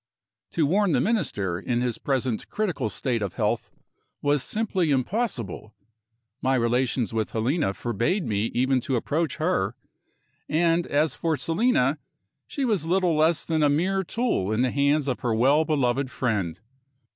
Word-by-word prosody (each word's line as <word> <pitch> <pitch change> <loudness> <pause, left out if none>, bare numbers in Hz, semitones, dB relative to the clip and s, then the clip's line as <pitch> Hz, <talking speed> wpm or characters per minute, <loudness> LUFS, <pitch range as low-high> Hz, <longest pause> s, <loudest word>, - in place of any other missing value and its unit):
To 160 - +2
warn 190 +3 +2
the - - +3
Minister, 115 - 0
in 120 +2 -1
his 120 -2 -2
present 130 -5 -1
critical 180 - -1
state 120 0 -2
of 100 -3 -3
health, - - -1 0.5
was 145 -1 +1
simply 190 - -1
impossible. 130 - -2 0.7
My 130 +1 +2
relations 120 0 0
with 110 -1 -2
Helena 115 - 0
forbade 120 - -1
me 105 0 0
even 130 +2 +1
to 130 +2 -1
approach 150 +5 -1
her. 155 - 0 0.7
And, 165 +2 +2
as 145 0 +1
for 160 -2 -1
Selina, 160 - +1 0.5
she 275 - -2
was 210 -9 +1
little 175 0 +2
less 160 +2 +2
than 160 -1 0
a 145 - +4
mere 185 +6 +1
tool 205 - -1
in 110 +3 +1
the 130 - +1
hands 140 +1 +2
of 130 - -1
her 120 -3 0
well 140 +7 +4
beloved 135 -3 +1
friend. 100 -11 -2
140 Hz, 155 wpm, -25 LUFS, 120-165 Hz, 0.7 s, a